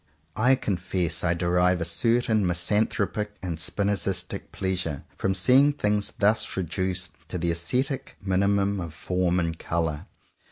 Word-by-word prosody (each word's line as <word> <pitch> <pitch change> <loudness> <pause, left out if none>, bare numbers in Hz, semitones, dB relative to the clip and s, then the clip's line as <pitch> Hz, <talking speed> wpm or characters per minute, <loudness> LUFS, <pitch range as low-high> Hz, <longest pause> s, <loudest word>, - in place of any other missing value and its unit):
I 125 +4 +4
confess 90 -6 -2
I 90 -1 +2
derive 90 +1 +2
a 85 - -1
certain 115 +4 +2
misanthropic 105 +3 0
and 85 -4 -3
Spi 90 +5 +1
nozistic 100 -2 -1
pleasure 90 -6 -2
from 95 0 -1
seeing 130 +9 +5
things 105 -6 0
thus 105 0 +1
reduced 90 0 -2 0.2
to 90 - -4
the 85 0 0
ascetic 125 - -2
minimum 100 +1 +1
of 85 -3 -6
form 90 0 0
and 85 -1 -2
colour. 80 -3 -2
95 Hz, 135 wpm, -26 LUFS, 85-105 Hz, 0.2 s, seeing